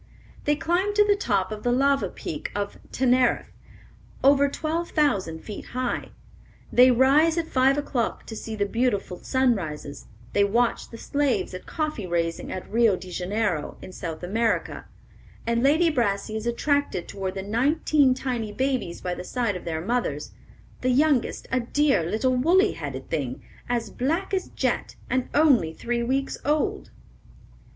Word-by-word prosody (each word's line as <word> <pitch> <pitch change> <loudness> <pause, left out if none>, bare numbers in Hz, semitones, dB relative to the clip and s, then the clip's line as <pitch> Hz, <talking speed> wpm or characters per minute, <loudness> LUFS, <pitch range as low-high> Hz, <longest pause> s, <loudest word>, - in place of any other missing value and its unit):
They 295 - +3
climb 360 +7 0
to 415 0 +5
the 410 0 +4
top 200 - 0
of 215 -1 -5
the 245 - +1
lava 275 +2 +2
Peak - - -6
of 200 0 -3
Teneriffe, 255 -1 +2 0.7
over 280 +1 +5
twelve 320 +4 -2
thousand 195 - 0
feet 210 - -7
high; 255 -1 -2 0.6
they 250 +1 +7
rise 280 +7 +4
at 335 - 0
five 265 0 +3
o'clock 265 -5 -2
to 220 - -7
see 220 0 -5
the 205 -1 0
beautiful 205 -5 -1
sunrises; 190 - -1 0.3
they 200 - +4
watch 230 +4 +1
the 230 - -9
slaves 285 -3 0
at 185 - -8
coffee 305 - -3
raising 170 -1 -2
at 185 - -5
Rio 225 -3 +3
de 185 0 -9
Janeiro, 180 -3 -2
in - - -10
South 165 -2 -6
America, 225 +5 -1 0.6
and 235 0 +1
Lady 315 +5 +4
Brassey 215 -5 0
is 220 +1 -3
attracted 285 - 0
toward 190 -1 -4
the 190 - -4
nineteen 270 +5 +2
tiny 245 -5 -3
babies 255 -7 -2
by 180 - -2
the - - -6
side 235 0 -1
of 180 - -7
their 160 -1 -2
mothers; 185 -8 -2 0.5
"the 255 - +1
youngest, 275 0 +2
a 260 - +2
dear, 275 - +2
little 225 +10 0
woolly 360 +10 +4
headed 135 -4 -6
thing, 135 -6 -3 0.3
as 235 -3 -1
black 330 +10 -1
as 375 -1 0
jet, - - -2 0.2
and 255 -1 0
only 275 - +4
three 235 +8 -2
weeks 265 +3 -1
old." 295 +1 0
245 Hz, 160 wpm, -25 LUFS, 200-280 Hz, 0.7 s, they